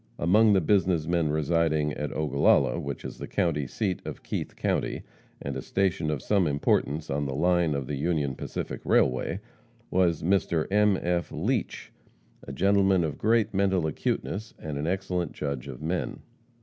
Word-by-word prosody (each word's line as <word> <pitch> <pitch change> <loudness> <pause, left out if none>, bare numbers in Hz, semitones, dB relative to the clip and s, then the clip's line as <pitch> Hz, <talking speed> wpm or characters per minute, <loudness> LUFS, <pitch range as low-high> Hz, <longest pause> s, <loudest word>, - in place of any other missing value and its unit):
Among 105 +5 +4
the 95 - +4
business 90 -3 +2
men 85 -2 +1
residing 80 0 +1
at 75 -1 -4
Ogallala, 75 -2 +2
which 70 -1 -5
is - - -7
the - - -6
county 75 -6 0
seat 95 - -2
of - - -7
Keith - - -4
county, - - -1 0.4
and 70 -1 -5
a 65 - -3
station 90 -4 0
of 75 -4 -2
some 100 -5 +2
importance 75 +1 0
on 70 +1 -1
the 65 - -3
line 85 0 +2
of 70 -2 -2
the 70 +2 -4
Union 75 -2 0
Pacific - - -5
railway, 65 0 +2 0.5
was 90 -4 +2
Mr. 85 -3 +1
M. 105 -1 +4
F. 85 0 -1
Leach, - - -2 0.5
a - - -9
gentleman 95 -1 +3
of 80 -2 -3
great 110 -1 +2
mental 95 -3 +2
acuteness, 100 +7 -3
and 75 -2 -5
an 75 - -2
excellent 90 -2 -2
judge 70 -3 -4
of 65 +2 -8
men. 85 +3 -2
85 Hz, 165 wpm, -27 LUFS, 75-95 Hz, 0.5 s, Among